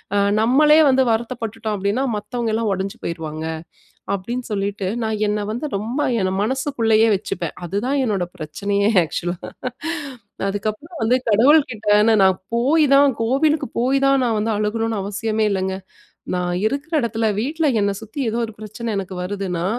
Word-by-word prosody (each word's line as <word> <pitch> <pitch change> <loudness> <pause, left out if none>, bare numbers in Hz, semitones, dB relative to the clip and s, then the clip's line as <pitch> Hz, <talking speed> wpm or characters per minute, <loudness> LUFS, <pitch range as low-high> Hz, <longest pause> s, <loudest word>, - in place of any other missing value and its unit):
அ - - +3 0.2
நம்மளே 300 +7 +5
வந்து 265 0 +4
வருத்தப்பட்டுட்டோம். 225 -2 -3
அப்பிடீன்னா, 200 +7 0
மத்தவங்கலாம் 220 0 -2
உடைஞ்சு 195 +4 -4
போயிருவாங்க. 160 -2 -4 0.7
அப்பிடீன்னு 235 +6 -4
சொல்லிட்டு 200 -1 -2 0.2
நான் 220 -1 -2
என்ன 210 0 -1
வந்து 240 +7 -3
ரொம்ப 235 +8 -2 0.2
என்ன 185 0 0
மனசுக்குள்ளயே 230 -3 +2
வச்சுப்பேன். 180 -4 -4
அதுதான் 235 - -1
என்னோட 195 -5 0
பிரச்சனையே! 200 +7 0 0.2
ஆக்ஷூலா 175 +2 -3 1.1
அதுக்கப்புறம் 215 - -4
வந்து 230 +3 +3
கடவுள்கிட்டே 225 -2 +4
நானு 210 -4 +5 0.3
போய் 285 +7 +3
தான் 275 0 +6
கோவிலுக்கு 275 +6 +2
போய் 260 +3 +2
தான், 275 -1 +4
நான் 225 -2 +1
வந்து 215 +2 0
அழுகணுன்னு 220 +1 -1
அவசியமே 215 +3 -1
இல்லங்க. 190 -1 -1 0.6
நான் 180 0 -1 0.2
இருக்குற 280 +7 -3
இடத்துல 225 -2 -1
வீட்ல 310 +7 -1
என்ன 200 0 +1
சுத்தி, 220 +5 -10
ஏதோ 230 - -2
ஒரு 225 - -10
பிரச்சன 215 +2 -5
எனக்கு 190 -1 -4
வருதுன்னா, 185 -3 -3
220 Hz, 140 wpm, -21 LUFS, 200-250 Hz, 1.1 s, தான்